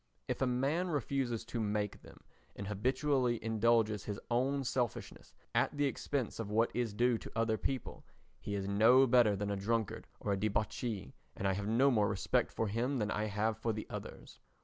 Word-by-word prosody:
If - - -3
a 130 - +3
man 140 +8 +1
refuses 130 -6 -1
to 120 0 -4
make 105 -1 -1
them - - -15 0.3
and 100 - -6
habitually 125 +4 +1
indulges 110 -2 +2
his 105 -1 -4
own 135 +3 +1
selfishness 125 -3 -3 0.2
at - - +1
the 145 - +2
expense 135 -3 -2
of 110 -3 -3
what 115 +2 +2
is 115 -4 -1
due 120 0 +2
to - - -9
other 115 -1 +2
people, 130 +2 -4 0.4
he 100 - -4
is 100 -1 -2
no 115 +7 +6
better 120 -4 +5
than 100 +1 -2
a - - 0
drunkard 110 +2 -1
or 100 - -1
a - - 0
debauchee, 105 - -2 0.2
and 95 - -1
I 95 - +2
have 100 +2 -3
no 130 +6 +4
more 105 -4 +3
respect 95 -2 0
for 115 - -1
him 120 +6 -1
than 105 -2 -1
I 105 - 0
have 110 +1 -1
for 115 0 0
the 110 - -5
others. - - -8
115 Hz, 195 wpm, -34 LUFS, 105-125 Hz, 0.4 s, no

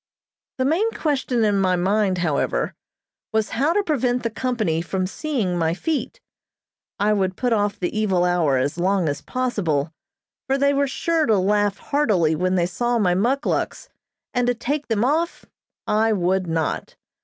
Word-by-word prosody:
The 260 - 0
main 345 +11 +2
question 265 -6 0
in 205 -2 +2
my 185 -1 +2
mind, 190 +1 +1
however, 165 -5 0 0.6
was 220 -1 0
how 275 +8 +1
to 410 - +2
prevent 250 - 0
the 230 - -1
company 220 -9 -1
from 185 +2 -2
seeing 215 - -2
my 165 0 +1
feet. 320 - -3 0.8
I 210 +1 +2
would 190 -2 0
put 245 -2 +1
off 205 -2 0
the 180 - -2
evil 195 -5 +2
hour 170 -6 +2
as 140 +6 -1
long 185 -1 +1
as 145 0 -2
possible, 175 - -1 0.5
for 270 0 +1
they 280 +1 +3
were 280 0 +2
sure 320 +3 0
to 220 -3 +4
laugh 205 +1 +1
heartily 200 - +1
when 185 +3 0
they 175 -2 +2
saw 240 +7 -1
my 185 -5 +2
muckluks, 245 +10 -1 0.4
and 245 0 +1
to 245 - +2
take 285 +5 -3
them 225 0 +1
off 325 +5 0 0.4
I 220 +1 +2
would 185 -1 0
not. 160 -1 -2
210 Hz, 165 wpm, -22 LUFS, 180-255 Hz, 0.8 s, to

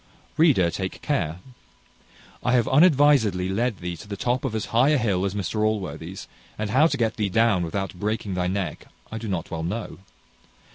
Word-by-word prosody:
Reader, 125 - +4
take 95 +1 -5
care. 90 - -1 1.0
I 125 - +1
have 120 -3 +3
unadvisedly 140 - +4
led 110 +2 0
thee 90 0 -5
to 105 - -12
the 100 -1 -5
top 125 +5 -1
of 125 -5 -2
as 110 - -2
high 125 +5 +5
a 150 - +4
hill 100 -6 0
as 100 0 -2
Mr 100 +2 -2
Allworthy's, 95 -4 -3 0.3
and 110 -1 -3
how 150 +7 +5
to - - -2
get 115 -2 0
thee 105 -2 0
down 105 -3 +2
without 95 +4 -3
breaking 105 +1 -3
thy 90 -1 -1
neck, 95 -4 -3 0.2
I 110 - -4
do 110 - -6
not 95 -2 -3
well 80 -2 -3
know. 95 +4 -4
105 Hz, 190 wpm, -24 LUFS, 90-120 Hz, 1.0 s, high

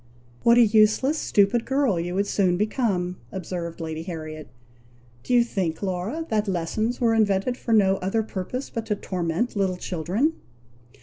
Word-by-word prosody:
"What 235 0 +5
a 240 - +7
useless, 220 +8 +3
stupid 205 +3 +2
girl 265 -9 +1
you 175 +2 -3
would 200 +1 +1
soon 185 -3 +1
become," 195 -4 -1
observed 175 -3 -5
Lady 160 -1 -4
Harriet. 155 -3 -7 0.7
"Do - - -7
you 245 -1 +6
think, 185 -7 -3
Laura, 200 - -2
that 215 -1 0
lessons 200 +6 -1
were 230 -2 +3
invented 215 +2 +2
for 240 - -5
no 195 -3 +4
other 195 +5 -1
purpose 215 +6 -5
but 225 -1 -4
to 210 - 0
torment 180 +5 -2
little 190 -3 0
children?" 185 - -1
200 Hz, 160 wpm, -24 LUFS, 180-230 Hz, 0.7 s, a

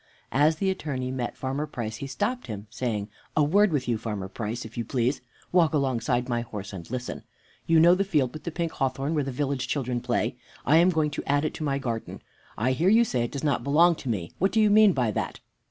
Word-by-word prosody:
As 150 +5 +4
the 190 +4 0
Attorney 135 -8 -3
met 125 -2 -3
Farmer 135 +3 -2
Price 110 -5 -5
he 140 - -5
stopped 240 - -2
him, 105 -2 -6
saying, 110 -4 -2 0.3
"A 150 - +5
word 200 +7 +4
with 140 -5 -1
you, 115 -2 0
Farmer 105 -4 -4
Price, 110 +4 -5
if 110 - -11
you 120 - -2
please. 125 +3 0 0.3
Walk 165 -3 +4
alongside 125 -3 0
my 120 -2 0
horse, 105 -3 -7
and 85 -3 -8
listen. 125 0 -4 0.5
You 165 -1 +5
know 170 +2 +7
the 190 +2 +2
field 150 -10 +1
with 155 - -8
the - - -3
pink 165 0 -2
hawthorn 135 +2 -1
where 150 -3 +1
the 135 - -3
village 135 0 -2
children 125 -4 -1
play? - - -1 0.3
I 150 +5 +5
am 175 +2 +6
going 155 -4 +1
to 145 - -3
add 145 +1 +2
it - - -2
to - - -5
my 140 -2 0
garden. 115 -4 -4 0.3
I 120 +4 +1
hear 160 +8 +2
you 225 +3 +6
say 125 - -1
it - - -6
does 140 - -5
not 145 -2 +1
belong 165 +5 +5
to 130 - -6
me. 90 -7 -2
What 195 +2 +2
do 220 - +2
you 215 -1 +5
mean 210 -2 +7
by 125 -6 +1
that?" - - -3
135 Hz, 240 wpm, -26 LUFS, 120-160 Hz, 0.5 s, know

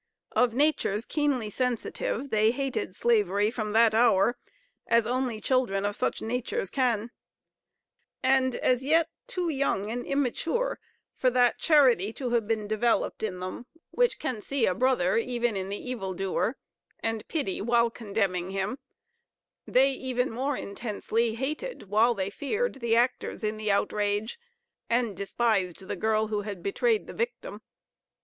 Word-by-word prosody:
Of 245 -2 +2
natures 260 -7 +1
keenly 275 -8 0
sensitive, 250 +2 -2
they 215 0 +4
hated 255 -6 -2
slavery, 210 -3 +2
from 215 -3 -3
that 225 0 +5
hour, 225 0 +4 0.5
as 230 -1 +4
only 245 -1 -1
children 215 -6 +1
of 205 0 -1
such - - -1
natures 225 -4 -2
can; 240 -4 0 1.1
and 260 -1 +3
as 250 0 +1
yet 325 +3 +3 0.2
too 355 -2 -2
young 265 -8 0
and 245 +1 -3
immature 285 - -1 0.4
for 255 - +2
that 245 -1 +3
charity 255 - +4
to 250 -1 -4
have 230 -3 +1
been 215 -2 -1
developed 220 +2 0
in 185 -4 -3
them, 185 +6 -6 0.2
which - - +2
can 240 -5 -3
see 275 +1 0
a 185 - +2
brother 230 -4 +2
even 240 -1 0
in 190 0 -3
the 200 - -3
evil 200 -7 -5
doer, 195 +6 -1 0.4
and 225 -1 -2
pity 280 - -2
while 235 +1 +3
condemning 200 -5 -2
him, 195 +6 -2 0.9
they 265 +2 +4
even 260 -1 -2
more 265 +4 -1
intensely 225 +2 -2
hated, 305 - -4
while 230 +3 +4
they 195 -1 -2
feared, 425 - -1
the 230 -1 +2
actors 245 -1 0
in 215 0 0
the 215 -1 -1
outrage, 205 - 0 0.5
and 235 -3 +1
despised 195 -2 -1
the - - -3
girl 220 0 +1
who 210 -1 -1
had 200 -4 -7
betrayed 440 - +1
the - - -9
victim. - - -4
235 Hz, 150 wpm, -28 LUFS, 210-260 Hz, 1.1 s, that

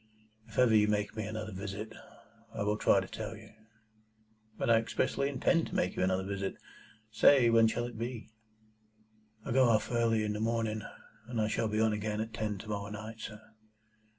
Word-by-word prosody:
If 110 - -13
ever 125 -3 +5
you 105 -1 +5
make 105 0 -1
me 110 -2 -3
another 110 0 -5
visit, 100 +3 -6 0.6
I - - -1
will 105 +1 +1
try - - +3
to - - -6
tell - - -6
you." - - -14 1.1
"But - - -2
I 115 -1 +6
expressly 140 +4 0
intend 165 +5 +1
to - - -7
make 90 - 0
you - - -2
another 95 0 +1
visit. 100 0 -3 0.6
Say, 120 +2 +6
when 115 -1 +6
shall 120 +2 -1
it 120 -2 -8
be?" 115 -2 -5 1.1
"I - - -3
go 130 0 +5
off 110 +1 +2
early 115 -2 +2
in 105 0 -1
the 105 - -4
morning, 110 -1 -1 0.5
and 120 -2 -3
I 110 - +2
shall 110 +1 0
be 105 0 -1
on 110 -1 +3
again 105 0 -2
at 110 +1 -4
ten 105 -2 -2
to 100 - -10
morrow 100 -1 -3
night, 110 +2 -7
sir." 110 -1 -7
110 Hz, 195 wpm, -31 LUFS, 105-115 Hz, 1.1 s, I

